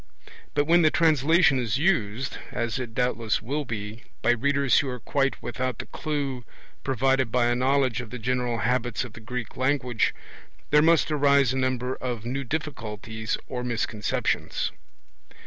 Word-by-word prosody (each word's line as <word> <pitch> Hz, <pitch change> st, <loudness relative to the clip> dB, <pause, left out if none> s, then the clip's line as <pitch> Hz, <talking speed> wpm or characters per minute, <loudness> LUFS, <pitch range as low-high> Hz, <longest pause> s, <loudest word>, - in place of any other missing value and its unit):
But 145 Hz, -, +3 dB
when 170 Hz, +3 st, +5 dB
the 155 Hz, -, +5 dB
translation 160 Hz, -2 st, +4 dB
is 115 Hz, -2 st, 0 dB
used, 130 Hz, -, 0 dB
as 115 Hz, +1 st, -2 dB
it 120 Hz, -3 st, -6 dB
doubtless 120 Hz, -3 st, 0 dB
will 145 Hz, +5 st, -3 dB
be, 110 Hz, -1 st, -5 dB, 0.2 s
by 120 Hz, -, +4 dB
readers 140 Hz, +2 st, +3 dB
who 140 Hz, -, -1 dB
are 125 Hz, -1 st, -5 dB
quite 135 Hz, +3 st, 0 dB
without 125 Hz, 0 st, -3 dB
the -, -, -6 dB
clue 140 Hz, -5 st, -3 dB, 0.4 s
provided 130 Hz, -1 st, +1 dB
by 125 Hz, 0 st, +3 dB
a 120 Hz, 0 st, +2 dB
knowledge 130 Hz, -1 st, +2 dB
of 120 Hz, -, -9 dB
the 125 Hz, -, -6 dB
general 125 Hz, 0 st, -1 dB
habits 120 Hz, 0 st, 0 dB
of 120 Hz, -4 st, -9 dB
the -, -, -10 dB
Greek 120 Hz, 0 st, -6 dB
language, 130 Hz, -3 st, +1 dB, 0.6 s
there 150 Hz, 0 st, +6 dB
must 165 Hz, 0 st, +4 dB
arise 140 Hz, -3 st, +4 dB
a -, -, -1 dB
number 130 Hz, -1 st, 0 dB
of 120 Hz, -3 st, -4 dB
new 135 Hz, +3 st, -2 dB
difficulties 110 Hz, -6 st, -4 dB
or 125 Hz, -1 st, -4 dB
misconceptions. 115 Hz, -3 st, -1 dB
125 Hz, 160 wpm, -26 LUFS, 120-140 Hz, 0.6 s, there